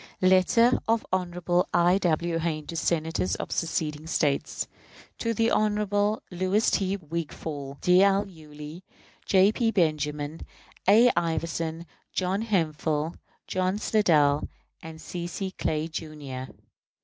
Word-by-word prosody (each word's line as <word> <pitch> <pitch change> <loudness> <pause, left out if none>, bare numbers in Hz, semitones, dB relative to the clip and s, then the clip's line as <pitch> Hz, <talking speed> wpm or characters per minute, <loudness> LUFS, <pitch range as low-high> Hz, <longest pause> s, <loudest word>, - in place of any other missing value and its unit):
Letter 190 +6 +4
of 225 0 +1
Hon. 180 -1 -1 0.4
I. 175 +3 +4
W. 170 -1 0
Hayne 155 -2 -2
to 170 - -7
Senators 165 +1 0
of - - -6
seceding 155 -2 -2
States. 145 -3 0 0.5
To 230 - 0
the 225 +1 +1
Honorable 210 0 +1
Louis 185 +5 +1
T. 195 0 0
Wigfall, 155 -4 -6
D. 180 +1 +5
L. 200 +1 +3
Yulee, 155 -1 -11 0.5
J. 195 +1 +5
P. 230 +1 +1
Benjamin, 150 -5 -1 0.5
A. 235 +4 +7
Iverson, 165 0 -2 0.3
John 190 +2 0
Hemphill, 160 -6 0 0.3
John 185 +1 -1
Slidell, 155 -10 +3 0.3
and 160 -1 -9
C. 175 +1 -5
C. 190 +2 -4
Clay, 155 -3 -2
Jr. 150 -5 -6
170 Hz, 120 wpm, -27 LUFS, 155-195 Hz, 0.5 s, A